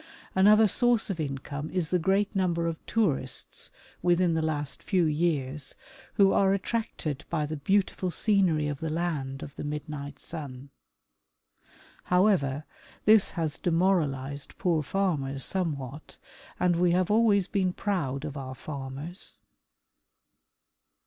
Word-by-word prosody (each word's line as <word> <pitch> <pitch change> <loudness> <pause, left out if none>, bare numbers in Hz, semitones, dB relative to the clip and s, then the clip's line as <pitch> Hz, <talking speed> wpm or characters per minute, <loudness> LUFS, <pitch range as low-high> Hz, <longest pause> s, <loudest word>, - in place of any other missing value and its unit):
Another 210 +3 +6
source 240 +1 +2
of 175 - -5
income 140 0 -4
is 180 -4 -1
the 180 - +3
great 195 +4 +1
number 175 -3 +1
of 165 -1 -3
tourists 155 - -1 0.3
within 175 -1 +3
the 160 - +1
last 150 -4 -2
few 185 -3 +1
years 150 -3 0 0.4
who 195 -1 +5
are 195 0 +4
attracted 185 - -3
by 155 -3 0
the 155 +1 -4
beautiful 190 +3 +1
scenery 180 -6 +2
of 145 -2 -3
the 160 - -3
land 150 -5 -2
of 145 - -9
the - - -5
midnight 145 -1 -5
sun. 140 -4 -8 1.3
Hov/ever, 180 -7 +2 0.4
this 215 -1 +6
has 160 -3 -1
demoralized 150 -6 0
poor 170 -4 +1
farmers 140 -5 -1
somewhat, 150 -6 -2 0.4
and 175 -1 +2
we 175 0 +3
have 185 +2 +1
always 210 -3 +4
been 190 -2 0
proud 155 -9 -2
of 150 -1 -6
our 130 -2 -6
farmers. 140 +6 -6
165 Hz, 130 wpm, -28 LUFS, 145-190 Hz, 1.3 s, Another